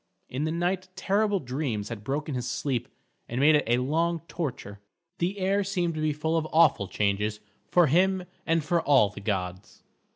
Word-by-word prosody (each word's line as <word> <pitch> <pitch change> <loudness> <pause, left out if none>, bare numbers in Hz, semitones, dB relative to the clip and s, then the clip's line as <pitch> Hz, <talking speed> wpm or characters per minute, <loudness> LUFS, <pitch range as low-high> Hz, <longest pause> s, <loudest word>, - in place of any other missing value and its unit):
In 135 +4 -2
the 155 - -1
night 180 +2 -1
terrible 200 +2 +1
dreams 125 - -3
had 110 -3 -6
broken 145 +5 -2
his 125 -1 -3
sleep, 125 -4 -2 0.4
and 120 - -2
made 150 +3 +6
it 150 - +4
a 120 +1 +3
long 165 +6 0
torture. 125 - -5 0.4
The 180 +4 -1
air 195 +1 +1
seemed 180 -3 -1
to 155 - -4
be 155 0 +2
full 160 +2 -1
of 160 -1 -1
awful 155 - +4
changes 105 +2 -1 0.3
for 175 -1 +5
him 185 +5 +3 0.2
and 165 -1 +1
for 170 +3 +1
all 135 -10 +4
the 100 - -10
gods. 95 -3 -4
150 Hz, 185 wpm, -27 LUFS, 120-175 Hz, 0.4 s, made